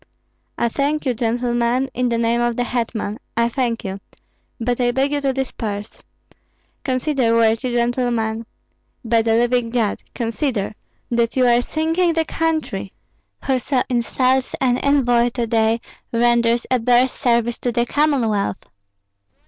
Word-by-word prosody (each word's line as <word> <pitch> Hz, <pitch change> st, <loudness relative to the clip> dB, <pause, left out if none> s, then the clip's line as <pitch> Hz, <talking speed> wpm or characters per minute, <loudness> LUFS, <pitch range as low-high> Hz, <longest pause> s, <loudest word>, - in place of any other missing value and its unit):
"I 235 Hz, -, +1 dB
thank 290 Hz, +5 st, -1 dB
you, 255 Hz, -, +1 dB
gentlemen, 240 Hz, +2 st, 0 dB
in 250 Hz, 0 st, 0 dB
the 235 Hz, -, 0 dB
name 230 Hz, +1 st, +1 dB
of 240 Hz, -1 st, +1 dB
the 245 Hz, -, 0 dB
hetman, 230 Hz, -3 st, -3 dB, 0.2 s
I 235 Hz, 0 st, +3 dB
thank 235 Hz, -2 st, -1 dB
you; 195 Hz, 0 st, -4 dB, 0.6 s
but 245 Hz, +1 st, -1 dB
I 245 Hz, -, +3 dB
beg 265 Hz, +3 st, +1 dB
you 290 Hz, -1 st, 0 dB
to 275 Hz, -1 st, +1 dB
disperse. 220 Hz, -6 st, -4 dB, 0.8 s
Consider, 255 Hz, -3 st, +1 dB
worthy 230 Hz, +2 st, +2 dB
gentlemen. 235 Hz, -2 st, 0 dB, 0.6 s
By 230 Hz, 0 st, +3 dB
the 225 Hz, 0 st, +2 dB
living 240 Hz, 0 st, +2 dB
God, 230 Hz, -3 st, 0 dB
consider 230 Hz, -3 st, -2 dB, 0.4 s
that 235 Hz, -1 st, +1 dB
you 255 Hz, -1 st, +3 dB
are 240 Hz, 0 st, +4 dB
sinking 325 Hz, +5 st, 0 dB
the 325 Hz, 0 st, +1 dB
country! 315 Hz, -14 st, -2 dB, 0.5 s
Whoso 260 Hz, 0 st, +1 dB
insults 255 Hz, +2 st, +1 dB
an 250 Hz, -1 st, +2 dB
envoy 245 Hz, -4 st, +3 dB
to 240 Hz, -2 st, 0 dB
day, 225 Hz, 0 st, +2 dB, 0.3 s
renders 235 Hz, 0 st, +2 dB
a 255 Hz, -, +3 dB
bear's 245 Hz, +2 st, +3 dB
service 235 Hz, -1 st, 0 dB
to 245 Hz, -, -1 dB
the 235 Hz, 0 st, +1 dB
Commonwealth." 235 Hz, -, +1 dB
240 Hz, 140 wpm, -20 LUFS, 230-260 Hz, 0.8 s, are